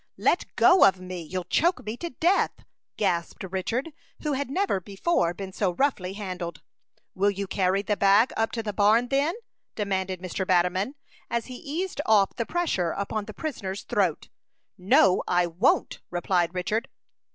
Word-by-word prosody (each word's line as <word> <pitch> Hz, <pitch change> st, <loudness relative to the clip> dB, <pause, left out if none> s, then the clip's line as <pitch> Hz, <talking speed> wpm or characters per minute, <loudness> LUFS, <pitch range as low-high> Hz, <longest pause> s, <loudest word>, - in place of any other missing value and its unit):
"Let -, -, +1 dB
go 370 Hz, 0 st, +6 dB
of 190 Hz, -1 st, +5 dB
me! 185 Hz, -1 st, -6 dB
You'll 180 Hz, +3 st, -4 dB
choke 335 Hz, -, +1 dB
me 215 Hz, +2 st, -3 dB
to 340 Hz, -, -5 dB
death!" 345 Hz, +8 st, +1 dB, 0.3 s
gasped 175 Hz, -4 st, -1 dB
Richard, 195 Hz, -, -2 dB, 0.3 s
who 300 Hz, -2 st, 0 dB
had 275 Hz, 0 st, -2 dB
never 370 Hz, -, 0 dB
before 195 Hz, -, 0 dB
been 190 Hz, 0 st, -7 dB
so 185 Hz, -3 st, 0 dB
roughly 200 Hz, -9 st, 0 dB
handled. 185 Hz, -4 st, -6 dB, 0.5 s
"Will 200 Hz, +2 st, +2 dB
you 200 Hz, 0 st, -3 dB
carry 190 Hz, +1 st, +1 dB
the 210 Hz, +1 st, 0 dB
bag 200 Hz, +5 st, +4 dB
up 225 Hz, 0 st, 0 dB
to 225 Hz, -, -2 dB
the 210 Hz, -1 st, -3 dB
barn, 220 Hz, +4 st, +3 dB
then?" 285 Hz, +6 st, +1 dB, 0.4 s
demanded 190 Hz, -3 st, -2 dB
Mr. 185 Hz, +1 st, -3 dB
Batterman, 185 Hz, +7 st, +1 dB, 0.3 s
as 235 Hz, -1 st, -1 dB
he 255 Hz, -, -8 dB
eased 320 Hz, +4 st, -3 dB
off 205 Hz, -3 st, +4 dB
the 230 Hz, -, -3 dB
pressure 320 Hz, -, 0 dB
upon 200 Hz, +1 st, -3 dB
the -, -, -8 dB
prisoner's 200 Hz, -, -4 dB
throat. 185 Hz, -7 st, 0 dB, 0.5 s
"No, 185 Hz, -1 st, +4 dB
I 175 Hz, 0 st, +3 dB
won't!" 185 Hz, -, +1 dB
replied 175 Hz, 0 st, 0 dB
Richard. 210 Hz, +8 st, -1 dB
200 Hz, 165 wpm, -26 LUFS, 185-250 Hz, 0.5 s, go